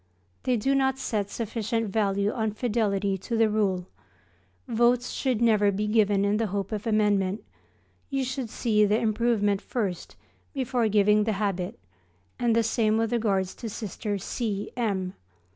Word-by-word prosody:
They 250 Hz, -2 st, +2 dB
do 270 Hz, +6 st, +1 dB
not 265 Hz, -1 st, +2 dB
set 210 Hz, -6 st, -2 dB
sufficient 225 Hz, 0 st, -2 dB
value 200 Hz, 0 st, +1 dB
on 220 Hz, -2 st, -1 dB
fidelity 205 Hz, -4 st, 0 dB
to 230 Hz, +5 st, -3 dB
the 225 Hz, -1 st, +3 dB
Rule. 195 Hz, -4 st, 0 dB, 0.8 s
Votes 240 Hz, +1 st, +2 dB
should 250 Hz, -4 st, 0 dB
never 210 Hz, -3 st, +4 dB
be 205 Hz, +2 st, -1 dB
given 210 Hz, -2 st, +3 dB
in 205 Hz, +1 st, +2 dB
the 225 Hz, 0 st, 0 dB
hope 200 Hz, +1 st, -3 dB
of 215 Hz, +1 st, -3 dB
amendment, 205 Hz, -2 st, +1 dB, 0.7 s
you 270 Hz, -2 st, 0 dB
should 260 Hz, -2 st, -4 dB
see 215 Hz, -2 st, +2 dB
the 210 Hz, +1 st, +3 dB
improvement 215 Hz, -2 st, +1 dB
first 200 Hz, -8 st, -3 dB, 0.4 s
before 250 Hz, -3 st, 0 dB
giving 210 Hz, 0 st, +4 dB
the 220 Hz, -, +1 dB
habit, 195 Hz, -3 st, -2 dB, 0.6 s
and 235 Hz, -2 st, +2 dB
the 230 Hz, -, +3 dB
same 220 Hz, -1 st, +1 dB
with 225 Hz, 0 st, 0 dB
regard 205 Hz, -5 st, +1 dB
to 220 Hz, +5 st, -7 dB
Sister 210 Hz, -1 st, -4 dB
C. 205 Hz, 0 st, -3 dB
M. 195 Hz, -6 st, -1 dB
215 Hz, 155 wpm, -26 LUFS, 200-230 Hz, 0.8 s, never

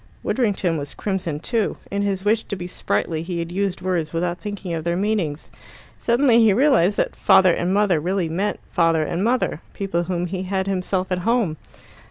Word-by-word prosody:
Widdrington 195 Hz, -9 st, 0 dB
was 145 Hz, 0 st, -7 dB
crimson 180 Hz, -7 st, -2 dB
too. 225 Hz, +5 st, -1 dB
In 200 Hz, 0 st, -1 dB
his 200 Hz, -1 st, -1 dB
wish 220 Hz, +2 st, +2 dB
to 200 Hz, -, -4 dB
be 180 Hz, -2 st, -6 dB
sprightly 165 Hz, -2 st, -2 dB
he 170 Hz, +1 st, -4 dB
had 170 Hz, 0 st, -3 dB
used 195 Hz, 0 st, -1 dB
words 175 Hz, -4 st, -1 dB
without 175 Hz, +1 st, -2 dB
thinking 205 Hz, -4 st, -5 dB
of 160 Hz, -1 st, -3 dB
their 170 Hz, +1 st, 0 dB
meanings. 185 Hz, -6 st, -1 dB, 0.5 s
Suddenly 240 Hz, 0 st, +4 dB
he 220 Hz, -3 st, +5 dB
realized 225 Hz, -, +3 dB
that -, -, 0 dB
"father" 185 Hz, -2 st, +5 dB
and 175 Hz, +2 st, -1 dB
"mother" 195 Hz, -4 st, +3 dB
really 180 Hz, +2 st, -1 dB
meant 185 Hz, +6 st, -2 dB
father 165 Hz, -3 st, +3 dB
and 170 Hz, +4 st, -2 dB
mother 240 Hz, -8 st, 0 dB
people 195 Hz, -4 st, -1 dB
whom 175 Hz, -1 st, -1 dB
he 180 Hz, +1 st, -4 dB
had 190 Hz, 0 st, -1 dB
himself 190 Hz, -1 st, -1 dB
at 180 Hz, -, +1 dB
home. 220 Hz, -4 st, +1 dB
185 Hz, 190 wpm, -22 LUFS, 170-205 Hz, 0.5 s, he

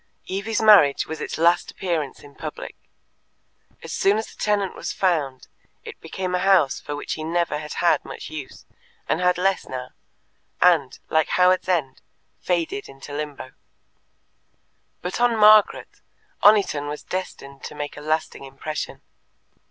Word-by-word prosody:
Evie's 205 Hz, +4 st, -2 dB
marriage 200 Hz, -10 st, +6 dB
was 160 Hz, -, -6 dB
its -, -, -4 dB
last 170 Hz, +2 st, +3 dB
appearance 165 Hz, -7 st, -3 dB
in 145 Hz, -1 st, -15 dB
public. -, -, -7 dB, 1.1 s
As -, -, -7 dB
soon 200 Hz, +2 st, +2 dB
as 220 Hz, -, -5 dB
a -, -, -19 dB
tenant 205 Hz, -2 st, 0 dB
was -, -, -4 dB
found, 150 Hz, -9 st, -1 dB, 0.4 s
it -, -, -10 dB
became 185 Hz, -1 st, -4 dB
a 180 Hz, -, +1 dB
house 190 Hz, -7 st, +3 dB
for 145 Hz, -, -6 dB
which 145 Hz, -, -4 dB
he 155 Hz, -, -5 dB
never 165 Hz, -1 st, -1 dB
had 150 Hz, 0 st, -7 dB
had 175 Hz, -, +2 dB
much -, -, -9 dB
use, 150 Hz, -4 st, -8 dB, 0.4 s
and 170 Hz, -, 0 dB
had 180 Hz, -1 st, +3 dB
less 190 Hz, +1 st, 0 dB
now, 130 Hz, -1 st, -6 dB, 0.7 s
and, 165 Hz, -7 st, +3 dB
like 160 Hz, -1 st, +3 dB
Howards 185 Hz, 0 st, +3 dB
End, 150 Hz, -8 st, -1 dB, 0.4 s
faded 170 Hz, -6 st, -2 dB
into 135 Hz, +1 st, -11 dB
Limbo. 145 Hz, -3 st, -6 dB, 1.5 s
But 180 Hz, +6 st, -3 dB
on 240 Hz, -2 st, +3 dB
Margaret 215 Hz, -1 st, +5 dB, 0.4 s
Oniton 200 Hz, -9 st, +4 dB
was 150 Hz, -, -6 dB
destined 140 Hz, -7 st, -6 dB
to 150 Hz, -, -8 dB
make 145 Hz, 0 st, -5 dB
a 145 Hz, -, -9 dB
lasting 155 Hz, -1 st, -2 dB
impression. 135 Hz, +3 st, -6 dB
165 Hz, 150 wpm, -23 LUFS, 145-185 Hz, 1.5 s, marriage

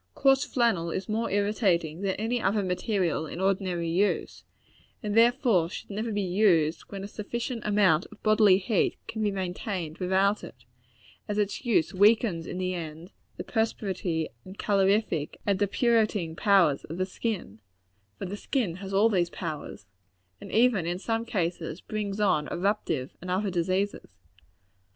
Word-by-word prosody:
Coarse 270 Hz, 0 st, +4 dB
flannel 230 Hz, -11 st, +1 dB
is 185 Hz, +3 st, -3 dB
more 220 Hz, +2 st, -1 dB
irritating 195 Hz, -5 st, +1 dB
than 195 Hz, -1 st, 0 dB
any 230 Hz, +3 st, -1 dB
other 200 Hz, +1 st, +1 dB
material 180 Hz, -3 st, -1 dB
in 170 Hz, -, -7 dB
ordinary 190 Hz, -3 st, 0 dB
use, 185 Hz, +5 st, 0 dB, 0.6 s
and 210 Hz, -, -2 dB
should -, -, -2 dB
therefore 230 Hz, -, +4 dB, 0.2 s
never 215 Hz, +3 st, -3 dB
be 205 Hz, -1 st, -1 dB
used 175 Hz, -4 st, +2 dB
when 195 Hz, -1 st, -6 dB
a -, -, -5 dB
sufficient 230 Hz, +3 st, -4 dB
amount 195 Hz, -5 st, +3 dB
of 215 Hz, -, -17 dB
bodily 215 Hz, -3 st, +5 dB
heat 200 Hz, +1 st, 0 dB
can 220 Hz, -, -4 dB
be 210 Hz, -, +2 dB
maintained 185 Hz, -3 st, -4 dB
without 190 Hz, +3 st, +2 dB
it; 120 Hz, +2 st, -12 dB, 0.6 s
as 210 Hz, -, -2 dB
its 210 Hz, +4 st, -1 dB
use 205 Hz, -7 st, +2 dB
weakens, 205 Hz, -3 st, +3 dB
in -, -, -5 dB
the 185 Hz, 0 st, -1 dB
end, 165 Hz, +1 st, -7 dB, 0.3 s
the -, -, -4 dB
perspiratory, 190 Hz, -7 st, -1 dB
and 190 Hz, +2 st, -11 dB
calorific, 195 Hz, -5 st, +1 dB
and 200 Hz, -2 st, +1 dB
depurating 210 Hz, -5 st, +1 dB
powers 180 Hz, -7 st, +3 dB
of 165 Hz, -, -7 dB
the 185 Hz, -, 0 dB
skin 185 Hz, -, -4 dB, 0.6 s
for -, -, -5 dB
the 190 Hz, +2 st, -4 dB
skin 205 Hz, -, -2 dB
has 195 Hz, 0 st, -7 dB
all 210 Hz, +3 st, +5 dB
these 180 Hz, -6 st, +1 dB
powers 150 Hz, -, -6 dB, 0.6 s
and -, -, -9 dB
even, 225 Hz, -7 st, +3 dB
in 175 Hz, +1 st, -1 dB
some 225 Hz, +4 st, -2 dB
cases, 170 Hz, -6 st, -2 dB
brings 210 Hz, -1 st, -4 dB
on 155 Hz, -8 st, +2 dB
eruptive 175 Hz, -8 st, -1 dB
and 180 Hz, -, -7 dB
other 190 Hz, +2 st, 0 dB
diseases. 185 Hz, -, -2 dB
195 Hz, 155 wpm, -27 LUFS, 175-215 Hz, 0.6 s, bodily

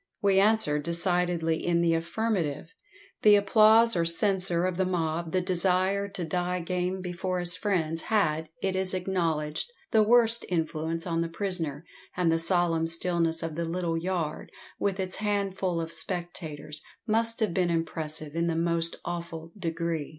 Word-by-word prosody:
"We 195 Hz, -1 st, +3 dB
answer 205 Hz, -8 st, +3 dB
decidedly 170 Hz, 0 st, +2 dB
in 170 Hz, -1 st, +1 dB
the 170 Hz, -1 st, +2 dB
affirmative. 170 Hz, -2 st, -2 dB, 0.5 s
The 210 Hz, -1 st, +7 dB
applause 215 Hz, +3 st, +5 dB
or 170 Hz, -, +2 dB
censure 180 Hz, 0 st, +1 dB
of 185 Hz, -1 st, -2 dB
the 190 Hz, -, +1 dB
mob, 165 Hz, -2 st, -2 dB
the 185 Hz, -, +1 dB
desire 185 Hz, +2 st, +1 dB
to 195 Hz, -3 st, -5 dB
'die 180 Hz, +2 st, -2 dB
game' 180 Hz, +2 st, -2 dB
before 180 Hz, 0 st, -3 dB
his 175 Hz, 0 st, +2 dB
friends, 165 Hz, -5 st, -1 dB
had, 160 Hz, -8 st, 0 dB
it 190 Hz, -1 st, 0 dB
is 190 Hz, 0 st, 0 dB
acknowledged, 170 Hz, -, -1 dB, 0.2 s
the 220 Hz, -, +5 dB
worst 230 Hz, +1 st, +4 dB
influence 165 Hz, -1 st, -2 dB
on 165 Hz, -2 st, -1 dB
the 170 Hz, -, -2 dB
prisoner, 165 Hz, -5 st, -2 dB, 0.3 s
and 175 Hz, -2 st, +2 dB
the 165 Hz, -, +2 dB
solemn 165 Hz, -1 st, +3 dB
stillness 165 Hz, -1 st, 0 dB
of 165 Hz, -1 st, -3 dB
the 170 Hz, +1 st, -2 dB
little 170 Hz, 0 st, -2 dB
yard, 165 Hz, -2 st, -3 dB, 0.3 s
with 195 Hz, -1 st, -1 dB
its 185 Hz, -1 st, -1 dB
handful 195 Hz, -4 st, -1 dB
of 165 Hz, 0 st, -5 dB
spectators, 160 Hz, -5 st, -5 dB, 0.2 s
must 230 Hz, +1 st, +1 dB
have 215 Hz, -6 st, 0 dB
been 180 Hz, -1 st, +1 dB
impressive 155 Hz, -2 st, -3 dB
in 170 Hz, 0 st, 0 dB
the 165 Hz, -, 0 dB
most 170 Hz, 0 st, 0 dB
awful 170 Hz, -1 st, -6 dB
degree." 165 Hz, -4 st, -3 dB
175 Hz, 160 wpm, -27 LUFS, 165-190 Hz, 0.5 s, The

